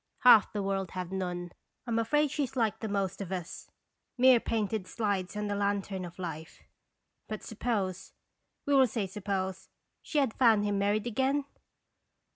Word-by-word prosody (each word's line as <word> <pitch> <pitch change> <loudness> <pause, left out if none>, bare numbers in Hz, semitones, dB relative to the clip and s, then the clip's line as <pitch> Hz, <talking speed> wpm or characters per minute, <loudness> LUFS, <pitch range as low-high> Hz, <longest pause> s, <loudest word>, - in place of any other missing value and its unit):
Half 235 -5 +7
the 205 -2 -2
world 195 -2 -1
have 180 -1 -4
none. 180 -2 -3 0.3
I 240 - -5
'm 230 - +2
afraid 295 +6 +2
she 300 - -1
was 270 -3 -3
like 225 -4 0
the 220 - -3
most 200 -2 -2
of 190 -2 -6
us, 180 -3 -6 0.5
mere 255 -1 +7
painted 215 -4 -2
slides 205 -3 -2
on 210 - -2
the 205 - -1
lantern 200 -2 -1
of 175 0 -10
Life. 165 -3 -7 0.6
But 215 -1 -5
suppose 205 -5 -3 0.5
we 285 - +1
will 265 -2 +6
say 220 -3 -2
suppose 190 -1 -4 0.3
she 305 - -4
had 270 -6 +2
found 225 -5 +4
him 205 -1 0
married 205 +1 +1
again?" 265 +4 0
205 Hz, 170 wpm, -30 LUFS, 190-230 Hz, 0.6 s, Half